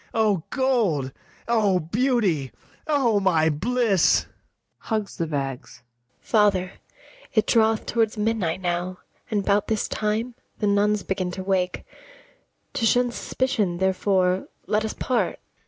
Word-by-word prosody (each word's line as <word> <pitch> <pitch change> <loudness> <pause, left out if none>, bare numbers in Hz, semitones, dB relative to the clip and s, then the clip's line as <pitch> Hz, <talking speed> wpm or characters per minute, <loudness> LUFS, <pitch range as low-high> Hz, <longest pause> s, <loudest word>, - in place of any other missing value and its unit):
O 215 -5 +2
gold! 220 - +1 0.4
O 210 -5 +3
beauty! 190 - 0 0.4
O 265 -9 +2
my 165 -5 +3
bliss! 210 +3 +2 0.5
[Hugs 215 -3 -3
the 165 - -1
bags.] 135 -5 -5
ABIGAIL. 120 +1 -46
Father, 200 -4 +2 0.6
it 215 - +4
draweth 220 -1 +2
towards 225 -2 0
midnight 210 -5 -1
now, 180 +1 -2 0.3
And 205 -3 -1
'bout 200 0 +2
this 220 -2 0
time 220 +3 -2 0.2
the 210 - -2
nuns 205 0 +2
begin 185 -1 -2
to 190 - -5
wake; 185 -2 -1 0.9
To 230 - 0
shun 245 +1 +3
suspicion, 215 -8 -1
therefore, 190 0 +1 0.2
let 210 +1 +1
us 220 - -3
part. 255 -2 -1
200 Hz, 125 wpm, -24 LUFS, 180-225 Hz, 0.9 s, it